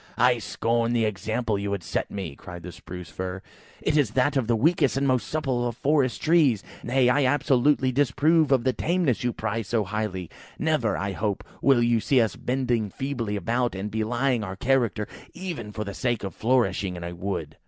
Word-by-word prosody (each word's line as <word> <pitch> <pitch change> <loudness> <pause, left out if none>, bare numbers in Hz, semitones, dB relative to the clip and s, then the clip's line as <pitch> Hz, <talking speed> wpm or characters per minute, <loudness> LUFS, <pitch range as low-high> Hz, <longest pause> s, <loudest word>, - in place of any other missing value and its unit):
"I 125 0 +4
scorn 115 +1 0
the 115 -2 +2
example 110 +2 -1
you 100 0 -3
would 100 -3 -2
set 90 - -2
me," 95 -8 -5
cried 90 +2 -10
the 90 - -7
Spruce 90 0 -9
fir; 95 0 -5 0.4
"it - - +1
is 145 -7 +3
that 135 +4 +3
of 130 -5 +1
the 120 - +3
weakest 140 +1 +2
and 140 0 +1
most 125 -6 +1
supple 130 -6 -1
of 120 -1 -5
forest 140 -4 +1
trees. 150 - +4 0.2
Nay, 125 +1 +2
I 135 +3 +3
absolutely 135 -1 +3
disapprove 145 +4 +3
of 130 -3 +4
the 130 0 +2
tameness 170 -8 0
you 120 - +1
prize 110 -1 -3
so 115 0 +1
highly. 100 -3 -3 0.3
Never, 155 -8 +1
I 100 0 -2
hope, 100 0 -2 0.2
will 130 -4 +4
you 120 -1 +3
see 130 +4 +3
us 115 -3 +1
bending 125 -4 -1
feebly 120 -3 -3
about, 115 +4 0
and 100 +2 -4
belying 120 +2 0
our 95 -1 -5
character, 115 -2 +1 0.3
even 170 - -5
for 105 +1 -4
the 100 -1 -6
sake 120 0 -1
of 95 - -4
flourishing 105 -6 +1
in 85 - -7
a 85 0 -5
wood!" 85 -4 -4
120 Hz, 195 wpm, -25 LUFS, 100-135 Hz, 0.4 s, I